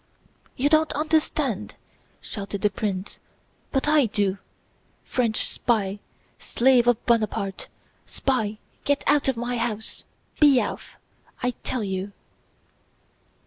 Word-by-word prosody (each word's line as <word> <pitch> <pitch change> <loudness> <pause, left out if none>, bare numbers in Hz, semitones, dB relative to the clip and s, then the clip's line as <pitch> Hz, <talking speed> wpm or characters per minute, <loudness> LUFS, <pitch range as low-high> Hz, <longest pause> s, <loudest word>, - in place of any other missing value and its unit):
"You 270 - +2
don't 310 0 +3
understand?" 310 +1 0 0.5
shouted 200 -1 -6
the 210 - +3
prince, 195 -2 -3 0.5
"but 270 +1 0
I 300 -4 +5
do! 200 -2 0 0.7
French 230 -4 0
spy, 205 -4 0 0.4
slave 245 -1 +3
of 245 -2 +2
Buonaparte, 215 -4 0 0.4
spy, 220 -6 -1 0.3
get 285 0 +1
out 290 -1 +3
of 265 -3 +1
my 245 +1 -2
house! 225 -2 -3 0.4
Be 285 -4 +7
off, - - -4 0.5
I 250 - +2
tell 250 -4 -1
you..." 190 0 -3
235 Hz, 110 wpm, -25 LUFS, 205-270 Hz, 0.7 s, Be